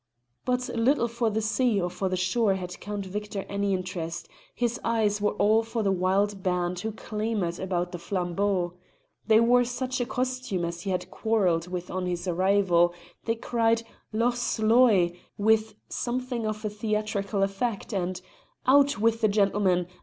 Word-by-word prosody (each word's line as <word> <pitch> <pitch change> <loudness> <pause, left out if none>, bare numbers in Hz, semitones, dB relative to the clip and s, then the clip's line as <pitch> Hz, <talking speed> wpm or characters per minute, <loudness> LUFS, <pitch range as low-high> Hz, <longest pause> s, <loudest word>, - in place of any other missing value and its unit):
But 250 0 0
little 235 +2 +2
for 235 0 0
the 220 +1 -1
sea 225 0 +2
or 175 - 0
for 190 +1 -2
the 185 - -1
shore 195 +3 +2
had 180 -1 -6
Count 205 -1 -5
Victor 205 +1 -5
any 200 0 -1
interest; 175 -2 -4 0.3
his 240 -1 -1
eyes 215 -3 +1
were 210 - +1
all 215 +2 +3
for 225 0 -3
the 195 - +2
wild 195 +2 +1
band 180 -1 -1
who 220 +4 -3
clamoured 210 -5 -3
about 180 -2 -2
the 175 - -6
flambeau. 180 0 -1 0.5
They 220 -1 +6
wore 245 +2 +5
such 250 +1 -2
a 240 - -1
costume 255 -8 -2
as 170 0 -5
he 195 - -4
had 180 0 -2
quarrelled 185 -7 +1
with 180 0 -5
on 185 -1 -2
his 175 0 -3
arrival; 180 -1 +3 0.3
they 230 - +1
cried 230 0 +1 0.3
"Loch 235 +3 +1
Sloy!" 220 -7 +3 0.2
with 220 +1 +2
something 245 -2 -2
of 215 0 -2
theatrical 210 -2 -1
effect, 200 +3 -2
and 185 -1 -2 0.5
"Out 280 0 +5
with 225 +2 +2
the 215 - +5
gentleman! 200 -3 +2
205 Hz, 160 wpm, -27 LUFS, 185-230 Hz, 0.5 s, They